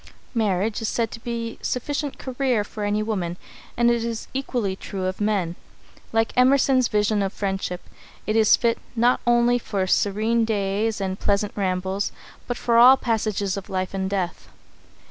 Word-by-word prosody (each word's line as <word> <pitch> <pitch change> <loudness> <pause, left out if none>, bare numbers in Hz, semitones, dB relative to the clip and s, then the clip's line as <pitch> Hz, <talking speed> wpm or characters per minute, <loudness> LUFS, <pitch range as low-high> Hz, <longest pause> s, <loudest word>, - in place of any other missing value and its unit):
Marriage 210 -2 0
is 225 - -1
said 230 -2 -1
to 230 - -8
be 230 -1 -5
sufficient 285 +3 -2
"career" 255 -4 0
for 210 +1 -7
any 205 +1 0
woman, 185 -6 -2 0.4
and 240 0 +4
it 235 -1 0
is 230 -1 -4
equally 245 -7 -2
true 190 -1 -5
of 185 +2 -3
men. 195 -5 0 0.6
Like 225 0 +1
Emerson's 255 0 +4
vision 210 0 +1
of 195 -1 -1
friendship, 195 -3 -3 0.4
it 215 - -1
is 220 -1 +6
fit 230 -1 0 0.2
"not 240 +2 +3
only 240 0 +4
for 200 -4 -2
serene 215 +5 +2
days 210 0 -1
and 190 0 -3
pleasant 200 0 +1
rambles, 190 0 -1 0.4
but 245 - -2
for 235 -1 +3
all 255 +3 +9
the - - -20
passages 215 -4 0
of 195 - -7
life 185 0 -2
and 190 -1 -2
death." 185 -3 -3
215 Hz, 165 wpm, -23 LUFS, 195-235 Hz, 0.6 s, all